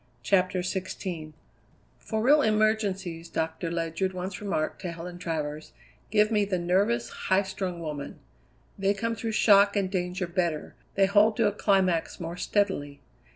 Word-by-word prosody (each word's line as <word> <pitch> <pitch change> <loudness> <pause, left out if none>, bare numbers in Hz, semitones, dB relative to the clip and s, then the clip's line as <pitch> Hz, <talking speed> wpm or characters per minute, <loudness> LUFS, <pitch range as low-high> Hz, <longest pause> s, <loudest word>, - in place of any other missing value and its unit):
CHAPTER 185 +5 +2
XVI 180 -3 -4 0.7
"For 220 0 -3
real 295 +4 +6
emergencies," 205 - 0
Doctor 160 +1 -2
Ledyard 170 +3 -2
once 185 +1 -5
remarked 190 -7 -2
to 180 -3 -3
Helen 175 +1 -8
Travers, 155 -3 -4 0.4
"give 210 +1 +3
me 210 -2 +3
the 195 -2 -1
nervous, 200 +7 +1 0.2
high 190 +1 +4
strung 190 -2 -4
women. 150 -3 -5 0.6
They 195 +1 +2
come 230 +3 -1
through 225 0 -4
shock 200 -1 +5
and 195 -2 0
danger 180 -1 -1
better, 170 -3 -2 0.2
they 195 - +5
hold 205 +2 +4
to 230 - +3
a - - +2
climax 190 -5 +1
more 170 0 -5
steadily. 180 -8 -1
185 Hz, 150 wpm, -27 LUFS, 170-205 Hz, 0.7 s, real